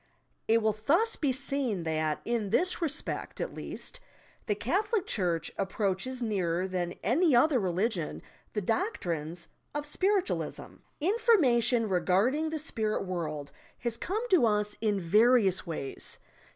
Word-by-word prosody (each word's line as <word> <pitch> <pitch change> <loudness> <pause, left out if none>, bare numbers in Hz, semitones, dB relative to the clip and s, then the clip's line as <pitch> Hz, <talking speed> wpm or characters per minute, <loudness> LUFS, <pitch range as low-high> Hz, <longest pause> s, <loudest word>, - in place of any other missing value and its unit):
It 225 0 +3
will 215 -1 +3
thus 430 +10 +3
be 285 -4 0
seen 260 -7 0
that, 155 -1 -1
in 230 -4 -1
this 360 - +1
respect 320 -2 -2
at - - -3
least, - - -4 0.5
the 210 - +1
Catholic 395 - 0
chureh 175 - -1
approaches 200 +5 -1
nearer 185 -5 0
than 180 -2 -2
any 285 - +3
other 270 +2 +4
religion 185 -2 -1 0.3
the 210 - -1
doctrines 175 - -2 0.3
of 295 0 -2
Spirit 380 +5 +1
ualism! - - -4 0.2
Information 275 - +3
regarding 205 - +2
the 315 - -3
spirit 220 -9 -2
world 155 -6 -4 0.3
has 235 -2 -1
come 420 - -2
to 325 -11 +5
us 210 -1 +1
in 210 -3 +1
various 205 +1 +4
ways. 145 -5 -4
225 Hz, 135 wpm, -29 LUFS, 185-295 Hz, 0.5 s, to